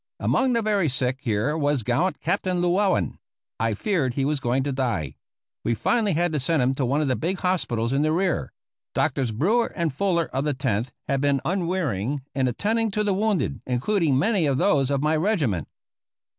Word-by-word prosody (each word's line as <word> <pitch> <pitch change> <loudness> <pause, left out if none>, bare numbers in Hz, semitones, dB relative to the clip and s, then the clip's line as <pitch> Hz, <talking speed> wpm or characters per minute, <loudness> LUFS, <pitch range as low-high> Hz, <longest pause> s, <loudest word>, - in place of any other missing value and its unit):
Among 260 -1 +2
the 230 -1 +1
very 205 -6 +2
sick 130 0 -1
here 115 +5 0
was 145 -5 0
gallant 135 - 0
Captain 185 -1 0
Llewellen. 185 +2 +1 0.4
I 115 -1 0
feared 140 - 0
he 135 - 0
was 150 0 0
going 130 +1 0
to 140 - -2
die. 120 - -1 0.5
We 115 - +1
finally 210 - +1
had 170 +1 +1
to 150 - +1
send 140 +1 +1
him 130 +2 +2
to 135 -2 -1
one 140 +4 +1
of 150 - 0
the 130 - +1
big 180 +7 -2
hospitals 130 -11 0
in 140 - +2
the 155 +1 +2
rear. 180 +2 0 0.4
Doctors 130 -4 0
Brewer 205 - +2
and 170 -5 -1
Fuller 170 +1 +1
of 135 +1 0
the 150 -2 0
Tenth 125 -3 -1 0.2
had 135 -1 0
been 140 -1 +2
unwearying 160 - -1
in 135 -2 +1
attending 220 - 0
to 210 +1 -1
the 205 -2 +1
wounded, 190 - 0
including 140 - +1
many 195 - +2
of 135 -2 +1
those 140 -1 +2
of 140 0 0
my 155 +1 +2
regiment. 155 - 0
145 Hz, 195 wpm, -24 LUFS, 130-185 Hz, 0.5 s, Among